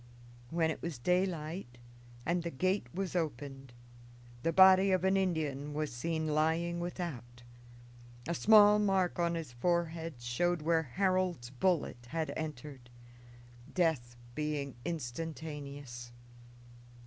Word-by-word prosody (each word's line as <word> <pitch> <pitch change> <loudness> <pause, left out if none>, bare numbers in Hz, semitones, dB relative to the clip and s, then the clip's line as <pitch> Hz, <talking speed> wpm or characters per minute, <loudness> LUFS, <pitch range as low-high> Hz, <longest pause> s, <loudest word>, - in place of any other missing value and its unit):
When 160 +1 +1
it - - -6
was 165 -5 -4
daylight, 165 -3 -1 0.5
and 175 +2 +1
the 170 - -3
gate 185 +2 0
was 185 +2 -3
opened, 135 -5 -3 0.7
the 165 - +1
body 190 +2 +7
of 185 -2 +2
an 190 +1 +3
Indian 150 -6 -1
was 150 -4 -2
seen 160 +6 -2
lying 160 +3 +1
without; 140 -9 -5 0.8
a 170 - 0
small 210 +3 +7
mark 195 -4 +1
on 170 0 +1
his 160 -6 -5
forehead 165 +3 -1
showed 150 +8 0
where 165 0 +3
Harold's 180 -3 0
bullet 135 -5 0
had 160 +3 -2
entered; 145 -5 -6 0.9
death 155 -10 +1 0.2
being 150 -2 -2
instantaneous. 145 -4 -5
160 Hz, 115 wpm, -33 LUFS, 140-175 Hz, 0.9 s, body